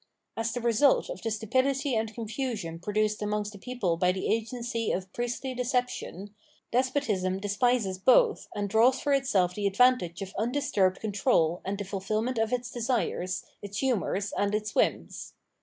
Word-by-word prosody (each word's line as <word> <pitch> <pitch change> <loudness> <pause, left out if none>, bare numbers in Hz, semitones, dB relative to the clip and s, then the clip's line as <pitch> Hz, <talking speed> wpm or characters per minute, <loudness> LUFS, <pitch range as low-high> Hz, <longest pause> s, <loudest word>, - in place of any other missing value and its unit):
As 225 0 -1
the 245 - -3
result 240 +4 +3
of - - -7
the 225 - -2
stupidity 260 +6 0
and 220 0 -1
confusion 220 -6 -4
produced 210 +2 0
amongst 210 0 -1
the 200 - -11
people 200 -7 -1
by 180 +1 +3
the 185 +1 -4
agency 230 0 -2
of 185 0 -4
priestly 245 +2 -3
deception, 245 -6 -2 0.4
despotism 235 -8 0
despises 205 -1 +1
both 425 - +4
and 205 -1 -1
draws 230 +6 +4
for 285 - +1
itself 205 -10 +2
the 205 +1 -1
advantage 200 -5 +3
of 190 - -9
undisturbed 220 -6 +1
control 185 -5 +1
and 195 +1 -3
the 200 - -4
fulfilment 215 +5 -2
of 225 0 +1
its 250 -1 -2
desires, 230 -6 -1 0.2
its 200 0 -5
hurnours, 205 -6 0
and 200 +1 +1
its 210 -1 -3
whims. - - -1
220 Hz, 155 wpm, -28 LUFS, 195-250 Hz, 0.4 s, both